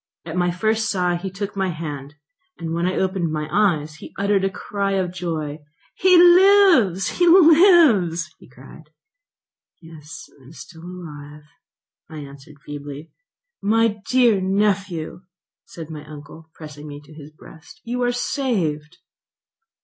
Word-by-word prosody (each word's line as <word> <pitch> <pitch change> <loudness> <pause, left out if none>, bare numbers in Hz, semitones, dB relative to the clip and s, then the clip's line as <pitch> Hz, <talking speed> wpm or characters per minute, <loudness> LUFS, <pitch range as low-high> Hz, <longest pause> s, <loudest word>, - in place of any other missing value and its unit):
At 160 0 -7
my 175 -1 +1
first 220 +5 -1
sigh 180 -2 0
he 185 +3 -5
took 200 +2 -6
my 190 -1 -1
hand; 150 -4 -7 0.4
when 170 +1 -2
I 185 - -2
opened 185 -3 -1
my 150 -1 -3
eyes 155 -7 0
he - - -13
uttered 200 0 +1
a 195 - +1
cry 200 0 -4
of 185 -2 -2
joy. 160 -4 -5 0.3
"He 370 -1 +4
lives! 350 - +5
he 350 - +4
lives!" 315 - +5
he - - -18
cried. 135 +5 -16 0.9
"Yes, 160 -2 -12
I - - -20
am 140 - -15
still 160 0 -13
alive," 150 -5 -10 0.7
I 160 - -10
answered 140 0 -12
feebly. 145 +1 -9 0.5
"My 215 0 +1
dear 240 -6 +3
nephew," 190 -4 -1 0.4
said 165 -2 -10
my 150 -2 -8
uncle, 150 +2 -13
pressing 150 -1 -11
me 145 -1 -9
to 150 +2 -17
his 150 -1 -12
breast, 160 - -16
"you 245 +1 -4
are 245 0 +1
saved." 190 - -3
175 Hz, 140 wpm, -21 LUFS, 155-210 Hz, 0.9 s, lives